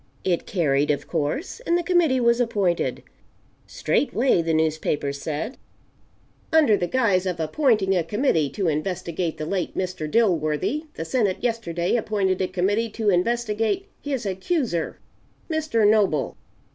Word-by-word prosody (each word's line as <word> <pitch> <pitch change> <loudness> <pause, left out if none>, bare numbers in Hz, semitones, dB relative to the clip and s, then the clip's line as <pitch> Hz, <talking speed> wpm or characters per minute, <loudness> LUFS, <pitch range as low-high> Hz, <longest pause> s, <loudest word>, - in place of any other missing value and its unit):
It 180 -3 0
carried, 145 -6 +1
of 145 - -1
course, 165 - -2
and 345 -8 +1
the 350 - -1
committee 335 -7 +3
was 235 0 +3
appointed. 200 -7 0 0.6
Straightway 255 -8 +1
the 165 0 -1
newspapers 155 -3 0
said: 160 - -4 0.9
"Under 305 -9 +5
the 175 -3 -1
guise 200 -7 +2
of 180 -2 -2
appointing 195 - +2
a 175 - +2
committee 165 - +1
to 195 +3 -2
investigate 170 +1 -2
the 155 - -4
late 185 +2 -3
Mr. 180 -4 -3
Dilworthy, 195 - +1
the 165 - -4
Senate 205 -1 +1
yesterday 225 -6 0
appointed 200 -4 0
a 185 - +1
committee 195 +5 0
to 215 -1 0
investigate 225 - 0 0.2
his 275 -6 -3
accuser, 190 - -1 0.5
Mr. 305 -9 +2
Noble. 205 -9 +2
195 Hz, 135 wpm, -24 LUFS, 165-235 Hz, 0.9 s, Under